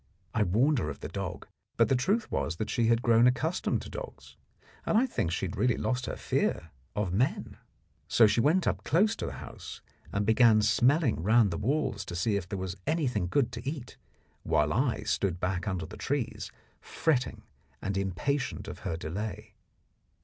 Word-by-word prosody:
I 115 Hz, -, +1 dB
warned 120 Hz, +9 st, +3 dB
her 75 Hz, -, -2 dB
of 70 Hz, -, -7 dB
the -, -, -4 dB
dog, -, -, -5 dB, 0.3 s
but -, -, +5 dB
the 135 Hz, -, +3 dB
truth 200 Hz, -, 0 dB
was 85 Hz, -, -1 dB
that 105 Hz, +4 st, -3 dB
she 115 Hz, -1 st, +2 dB
had 115 Hz, +1 st, +2 dB
grown 115 Hz, +1 st, +5 dB
accustomed 155 Hz, +8 st, 0 dB
to -, -, -9 dB
dogs, -, -, -9 dB, 0.5 s
and -, -, +2 dB
I 245 Hz, -, +4 dB
think 90 Hz, -, -2 dB
had 90 Hz, 0 st, -2 dB
really 125 Hz, -2 st, +2 dB
lost 125 Hz, 0 st, -1 dB
her -, -, -3 dB
fear 80 Hz, 0 st, -1 dB, 0.2 s
of 105 Hz, -4 st, -1 dB
men. 120 Hz, +8 st, 0 dB, 0.5 s
So 115 Hz, -, +6 dB
she 105 Hz, +2 st, +3 dB
went 165 Hz, +7 st, +3 dB, 0.2 s
close 200 Hz, +6 st, +3 dB
up -, -, -9 dB
to -, -, -3 dB
the -, -, -4 dB
house, -, -, -9 dB, 0.3 s
and 100 Hz, +1 st, 0 dB
began 110 Hz, -1 st, +5 dB
smelling 120 Hz, -, +3 dB
round 110 Hz, +2 st, +4 dB
the 85 Hz, -, -3 dB
walls 135 Hz, -4 st, 0 dB
to 85 Hz, -, -6 dB
see 100 Hz, +5 st, +1 dB
if 95 Hz, -3 st, -3 dB
there 100 Hz, -, -3 dB
was 95 Hz, 0 st, -4 dB
anything 130 Hz, -, 0 dB
good 120 Hz, +5 st, +1 dB
to 120 Hz, +4 st, -4 dB
eat, 140 Hz, -5 st, -7 dB, 0.4 s
while 75 Hz, 0 st, +1 dB
I 125 Hz, +1 st, +1 dB
stood 90 Hz, -3 st, 0 dB
back 90 Hz, +2 st, -2 dB
under 90 Hz, -5 st, -2 dB
the 105 Hz, +7 st, -10 dB
trees 140 Hz, -4 st, -2 dB, 0.3 s
fretting 130 Hz, -6 st, -1 dB, 0.4 s
and 100 Hz, -, -3 dB
impatient 100 Hz, +9 st, -2 dB
of -, -, -7 dB
her 80 Hz, -, -3 dB
delay. 95 Hz, +6 st, -5 dB
115 Hz, 185 wpm, -29 LUFS, 95-135 Hz, 0.5 s, So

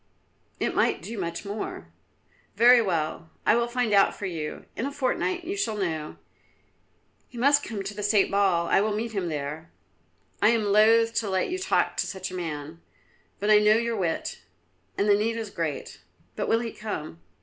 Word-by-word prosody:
"It -, -, -1 dB
might -, -, +1 dB
do 230 Hz, -, -6 dB
much 170 Hz, +2 st, -4 dB
more." 205 Hz, +2 st, -6 dB, 0.6 s
"Very 245 Hz, +1 st, +7 dB
well, 165 Hz, -4 st, -2 dB, 0.2 s
I -, -, +5 dB
will 235 Hz, 0 st, +1 dB
find 240 Hz, -3 st, -1 dB
out 200 Hz, -1 st, +4 dB
for 205 Hz, -, -6 dB
you; 160 Hz, -5 st, -5 dB
in 245 Hz, -, -2 dB
a -, -, -4 dB
fortnight 290 Hz, +6 st, -1 dB
you 380 Hz, +4 st, -3 dB
shall 395 Hz, -, -1 dB
know. 160 Hz, -6 st, -3 dB, 1.1 s
He 245 Hz, -, -13 dB
must 285 Hz, +4 st, +4 dB
come 210 Hz, -4 st, -5 dB
to 195 Hz, +2 st, -5 dB
the 210 Hz, -, -6 dB
State 205 Hz, -1 st, +2 dB
Ball; 195 Hz, -4 st, +2 dB
I 180 Hz, -, +3 dB
will 210 Hz, 0 st, 0 dB
meet 225 Hz, +2 st, -3 dB
him 195 Hz, -5 st, -2 dB
there." 150 Hz, +2 st, -5 dB, 0.7 s
"I 210 Hz, -, +6 dB
am 230 Hz, -1 st, +2 dB
loth 220 Hz, +3 st, +4 dB
to 215 Hz, -, -4 dB
let 190 Hz, -1 st, 0 dB
you 370 Hz, -, -2 dB
talk 380 Hz, 0 st, +1 dB
to -, -, 0 dB
such 190 Hz, -1 st, -5 dB
a -, -, -6 dB
man, 160 Hz, -2 st, -5 dB, 0.6 s
but 205 Hz, +1 st, +1 dB
I 210 Hz, -, +8 dB
know 210 Hz, +1 st, +5 dB
your 235 Hz, 0 st, -1 dB
wit, 175 Hz, -6 st, -2 dB, 0.6 s
and 200 Hz, -, +1 dB
the 205 Hz, -, +6 dB
need 220 Hz, +3 st, 0 dB
is 220 Hz, -3 st, -5 dB
great. 150 Hz, -, -4 dB, 0.3 s
But -, -, -2 dB
will 225 Hz, -, +2 dB
he 230 Hz, -1 st, -4 dB
come?" 155 Hz, -, -6 dB
205 Hz, 195 wpm, -26 LUFS, 170-230 Hz, 1.1 s, I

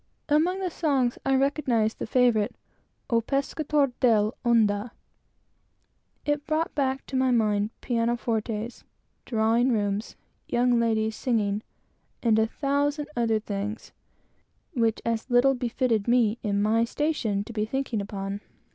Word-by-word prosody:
Among 330 Hz, +6 st, +2 dB
the 370 Hz, -2 st, -2 dB
songs 275 Hz, -7 st, 0 dB
I 270 Hz, -, +4 dB
recognized 265 Hz, -5 st, +1 dB
the -, -, -4 dB
favorite 240 Hz, -5 st, +2 dB, 0.6 s
"O 230 Hz, 0 st, +4 dB
Pescator 280 Hz, +2 st, 0 dB
dell' 220 Hz, -3 st, +3 dB
onda." 225 Hz, -2 st, +2 dB, 1.4 s
It 295 Hz, 0 st, -1 dB
brought 315 Hz, +1 st, 0 dB
back 270 Hz, -1 st, -1 dB
to 270 Hz, -, -6 dB
my 260 Hz, 0 st, +3 dB
mind 210 Hz, -3 st, +2 dB
pianofortes, 230 Hz, -1 st, -1 dB, 0.4 s
drawing 230 Hz, +2 st, +2 dB
rooms, 205 Hz, -1 st, -1 dB, 0.3 s
young 245 Hz, 0 st, +2 dB
ladies 220 Hz, -1 st, +1 dB
singing, 215 Hz, -5 st, 0 dB, 0.6 s
and 220 Hz, -2 st, +4 dB
a 220 Hz, -, +3 dB
thousand 285 Hz, +3 st, -1 dB
other 230 Hz, -2 st, +1 dB
things 210 Hz, +1 st, -5 dB, 0.8 s
which 230 Hz, -5 st, 0 dB
as 230 Hz, +2 st, -2 dB
little 245 Hz, +2 st, +5 dB
befitted 245 Hz, -3 st, 0 dB
me, 235 Hz, -2 st, +3 dB
in 205 Hz, -2 st, 0 dB
my 225 Hz, +2 st, +3 dB
situation, 235 Hz, -6 st, -1 dB
to 230 Hz, -, -10 dB
be 215 Hz, -1 st, 0 dB
thinking 255 Hz, -2 st, -2 dB
upon. 200 Hz, 0 st, -5 dB
235 Hz, 130 wpm, -26 LUFS, 215-265 Hz, 1.4 s, little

